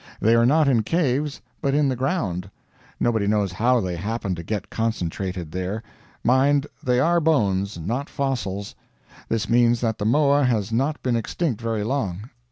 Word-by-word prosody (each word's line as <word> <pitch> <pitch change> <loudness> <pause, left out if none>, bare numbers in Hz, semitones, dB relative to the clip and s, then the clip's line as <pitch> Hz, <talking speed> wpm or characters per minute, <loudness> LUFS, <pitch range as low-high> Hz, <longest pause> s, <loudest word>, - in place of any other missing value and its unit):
They 115 - +3
are 115 0 +5
not 155 +2 +4
in 125 -5 +4
caves, 145 +1 0 0.2
but 140 -1 +1
in 150 -1 +3
the 130 - 0
ground. 120 - -2 0.5
Nobody 110 -4 +1
knows 105 -3 +1
how 120 +7 +2
they 90 -4 -2
happened 100 0 -2
to 85 - -6
get 105 +3 -4
concentrated 95 -6 -3
there. 95 +5 -3 0.4
Mind, 135 +3 +3 0.2
they 125 -1 +1
are 170 +5 +3
bones, 105 - +1
not 115 - -3
fossils. 100 -8 -3 0.6
This 115 -2 -1
means 120 0 +4
that 115 -2 -1
the 105 - -2
moa 145 +4 +4
has 115 -5 +1
not 135 +6 0
been 125 -2 +1
extinct 120 +2 -2
very 115 -2 -1
long. 110 -3 -3
115 Hz, 170 wpm, -23 LUFS, 100-135 Hz, 0.6 s, are